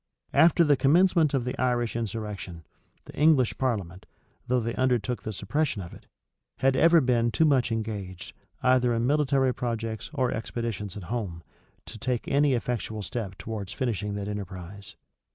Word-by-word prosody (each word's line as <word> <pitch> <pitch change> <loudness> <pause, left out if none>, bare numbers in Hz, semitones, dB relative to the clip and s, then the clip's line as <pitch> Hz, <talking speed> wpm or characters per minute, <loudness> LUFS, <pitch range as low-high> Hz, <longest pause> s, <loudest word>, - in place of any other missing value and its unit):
After 165 +3 +6
the 150 -3 +4
commencement 160 +1 +4
of 125 -3 0
the 125 - -2
Irish 120 -2 0
insurrection, 105 -6 -5 0.4
the - - -12
English 145 -5 +3
parliament, 100 -8 -2 0.4
though 125 +1 +2
they 115 0 -2
undertook 125 -2 0
the 110 - -5
suppression 115 +5 -1
of 85 -3 -8
it, - - -15 0.5
had 135 0 +2
ever 165 +4 +6
been 120 -3 +2
too 160 +7 +2
much 130 -5 +2
engaged, 105 -5 -4 0.3
either 125 -2 +3
in 115 +1 0
military 135 -2 +2
projects 115 -3 -4
or 130 -4 +1
expeditions 110 -3 -4
at 100 - -7
home, 95 -5 -4 0.4
to 110 - -10
take 125 +1 -2
any 140 -1 +3
effectual 110 -3 -3
step 100 -4 -5
towards 100 -1 -6
finishing 105 -5 -2
that 100 -1 -4
enterprise. 100 -1 -7
115 Hz, 155 wpm, -27 LUFS, 105-130 Hz, 0.5 s, After